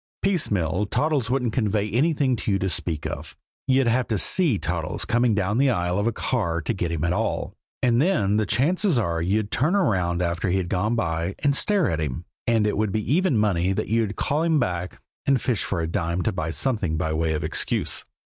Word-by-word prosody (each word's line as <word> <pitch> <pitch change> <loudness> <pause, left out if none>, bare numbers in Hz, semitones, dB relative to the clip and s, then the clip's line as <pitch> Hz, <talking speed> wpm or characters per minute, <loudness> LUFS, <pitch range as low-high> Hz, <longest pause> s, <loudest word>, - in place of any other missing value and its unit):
Piecemeal, 105 - +1
Toddles 140 0 0
wouldn't 125 -3 0
convey 105 -3 0
anything 140 - +2
to 110 - -4
you 100 - +2
to 95 0 -1
speak 80 -3 -2
of. - - -6 0.3
You'd 135 0 +3
have 120 +2 +1
to 110 - 0
see 155 - +2
Toddles 85 -3 -3
coming 120 -2 +2
down 105 +3 0
the 140 0 +4
aisle 90 -4 0
of 105 - 0
a - - +2
car 100 -8 -1
to 80 +8 -2
get 90 -4 -2
him 85 -2 -2
at 90 0 +1
all - - -2 0.3
and 120 0 +3
then 105 - +2
the 110 -2 +1
chances 175 - +2
are 85 -7 0
you'd 100 +4 0
turn 155 - +1
around 90 - +1
after 85 +2 -1
he'd 90 -1 0
gone 100 +6 0
by 85 -3 -1
and 140 -1 +3
stare 200 +4 +2
at 80 -4 -1
him, 75 +3 -4 0.2
and 115 -2 +3
it 105 - 0
would 105 -1 0
be 110 +5 -1
even 180 -7 +2
money 95 -3 +1
that 110 +3 -3
you'd 110 -2 0
call 150 +2 0
him 165 -2 +2
back 90 -6 -2 0.3
and 135 -2 +4
fish 115 -3 -1
for - - -2
a 80 - -1
dime 85 0 -1
to 110 - +1
buy 85 -5 -3
something 100 -4 -1
by 80 0 -1
way 80 0 0
of 75 - -2
excuse. - - -1
105 Hz, 215 wpm, -24 LUFS, 90-125 Hz, 0.3 s, the